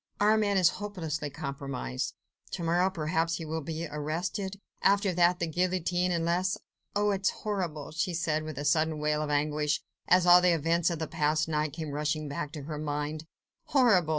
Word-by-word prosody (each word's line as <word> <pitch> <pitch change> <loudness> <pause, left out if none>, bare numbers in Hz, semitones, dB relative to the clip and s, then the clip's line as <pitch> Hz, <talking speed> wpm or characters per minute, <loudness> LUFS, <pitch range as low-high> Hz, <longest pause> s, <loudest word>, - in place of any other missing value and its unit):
Armand 210 -1 +3
is 180 -3 +6
hopelessly 160 -8 -3
compromised... 135 - -4 0.3
to 170 - -4
morrow, 175 +3 +3
perhaps 165 -1 0
he 165 - -5
will 160 +1 -3
be 160 +2 -4
arrested... 175 +6 -3 0.2
after 200 -1 +3
that 175 +1 +4
the 175 - -1
guillotine... 180 +1 0
unless... 175 +2 +1
unless... - - -22 0.4
oh! 205 0 +2
it 195 -1 -1
is 190 - +3
horrible!"... 175 -9 -3
she 170 +4 -1
said, 155 -2 0
with 155 -3 -7
a 145 - -3
sudden 155 +1 +2
wail 150 0 0
of 150 - -2
anguish, 150 0 +1 0.3
as 180 0 +5
all 175 0 +8
the 180 -1 +4
events 165 +2 +2
of 170 - -2
the 160 - -2
past 155 0 +1
night 150 -2 -1
came 155 -2 -5
rushing 150 +1 -1
back 145 +1 -4
to 150 -3 -7
her 150 +1 -5
mind, 150 +1 -3 0.4
"horrible! 220 - +4
160 Hz, 185 wpm, -29 LUFS, 150-180 Hz, 0.4 s, all